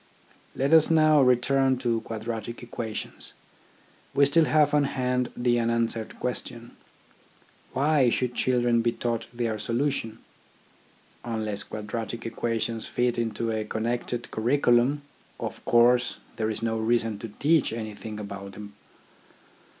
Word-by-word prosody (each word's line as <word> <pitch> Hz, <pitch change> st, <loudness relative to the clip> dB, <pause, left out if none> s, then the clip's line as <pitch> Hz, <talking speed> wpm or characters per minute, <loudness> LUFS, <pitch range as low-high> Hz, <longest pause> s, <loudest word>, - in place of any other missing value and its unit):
Let 140 Hz, +4 st, +1 dB
us 160 Hz, -1 st, +7 dB
now 155 Hz, -2 st, +5 dB
return 130 Hz, +1 st, +3 dB
to 120 Hz, -2 st, 0 dB
quadratic 115 Hz, +1 st, -5 dB
equations. 115 Hz, -2 st, -6 dB, 0.8 s
We 140 Hz, -, +6 dB
still 155 Hz, +3 st, +4 dB
have 150 Hz, -1 st, +3 dB
on 145 Hz, -1 st, +4 dB
hand 125 Hz, -2 st, -1 dB
the 120 Hz, -1 st, +2 dB
unanswered 115 Hz, -1 st, -1 dB
question. 120 Hz, -1 st, -4 dB, 1.0 s
Why 140 Hz, -2 st, +3 dB
should 125 Hz, +1 st, -1 dB
children 120 Hz, -2 st, +2 dB
be 115 Hz, 0 st, +1 dB
taught 115 Hz, -2 st, -2 dB
their 115 Hz, -3 st, -2 dB
solution? 115 Hz, -1 st, -1 dB, 1.1 s
Unless 110 Hz, -3 st, -3 dB
quadratic 110 Hz, +1 st, -5 dB
equations 115 Hz, 0 st, -2 dB
fit 120 Hz, -1 st, 0 dB
into 115 Hz, 0 st, -1 dB
a 110 Hz, -1 st, -1 dB
connected 120 Hz, +2 st, -3 dB
curriculum, 125 Hz, +3 st, +2 dB, 0.4 s
of -, -, -5 dB
course 120 Hz, +1 st, +4 dB, 0.2 s
there 110 Hz, -1 st, 0 dB
is 110 Hz, +1 st, -3 dB
no 115 Hz, -1 st, 0 dB
reason 115 Hz, -2 st, 0 dB
to 115 Hz, -, -6 dB
teach 150 Hz, +7 st, +2 dB
anything 110 Hz, -1 st, -6 dB
about 100 Hz, -1 st, -7 dB
them. 105 Hz, 0 st, -10 dB
120 Hz, 125 wpm, -26 LUFS, 110-125 Hz, 1.1 s, us